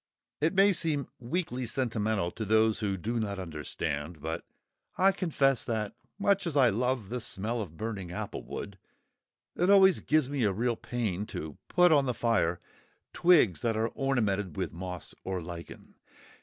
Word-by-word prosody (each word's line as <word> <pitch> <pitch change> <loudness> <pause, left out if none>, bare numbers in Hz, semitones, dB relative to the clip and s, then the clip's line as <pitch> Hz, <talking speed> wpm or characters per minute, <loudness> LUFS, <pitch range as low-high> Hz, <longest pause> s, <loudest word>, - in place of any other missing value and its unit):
It 160 +5 +1
may 200 +1 +6
seem 150 -5 +1
weakly 130 0 -2
sentimental 110 -7 0
to 110 - -5
those 110 +1 +3
who 100 -2 -1
do 115 +6 -2
not 100 -2 -2
understand, 75 -2 -4
but 80 +3 -4 0.5
I 190 +1 +5
confess 140 -8 +1
that, 110 -3 -2 0.2
much 200 -2 +2
as 150 -3 -1
I 130 -3 +6
love 120 -1 -1
the 125 0 -3
smell 110 +3 -2
of 80 -6 -8
burning 105 -4 -4
applewood, 95 +2 -6 0.8
it 180 +2 +1
always 190 -2 +7
gives 155 -3 +2
me 140 -2 -1
a 105 - +3
real 115 +5 0
pain 105 -5 -3
to 75 -2 -7
put 180 -1 +5
on 140 -3 +4
the 125 - -1
fire 90 -8 +1 0.5
twigs 160 - +4
that 115 -2 0
are 115 +1 +1
ornamented 105 - -1
with - - -2
moss 90 0 -6
or 95 -1 -2
lichen. 85 0 -9
115 Hz, 160 wpm, -29 LUFS, 95-140 Hz, 0.8 s, always